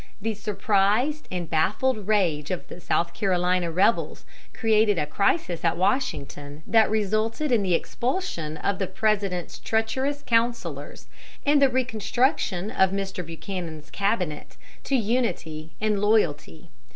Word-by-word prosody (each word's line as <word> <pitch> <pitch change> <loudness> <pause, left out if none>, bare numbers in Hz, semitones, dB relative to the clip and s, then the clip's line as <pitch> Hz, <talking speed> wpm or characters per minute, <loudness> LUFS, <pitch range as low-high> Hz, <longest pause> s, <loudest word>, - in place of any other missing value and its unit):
The 225 0 -2
surprised 210 +7 +1
and 180 -2 -3
baffled 205 - 0
rage 170 -9 +1
of 185 - -4
the 180 - -9
South 170 0 0
Carolina 180 -2 +1
rebels 185 +7 +1 0.3
created 215 -3 +2
a 150 - +1
crisis 180 - 0
at 165 -1 +1
Washington 150 - -2
that 225 -1 +4
resulted 220 +6 0
in 235 -4 +4
the 185 -3 +2
expulsion 205 - -2
of 200 -1 -1
the 195 - -1
President's 200 -5 -1
treacherous 260 +6 -1
counselors 235 0 -1 0.4
and 290 0 +4
the 275 - +6
reconstruction 230 - 0
of 190 0 +3
Mr. 195 -1 -3
Buchanan's 165 -1 -7
cabinet 195 -6 -2 0.3
to 275 - +1
unity 205 -10 -1
and 215 -1 +1
loyalty. 175 - 0
200 Hz, 125 wpm, -25 LUFS, 175-225 Hz, 0.4 s, the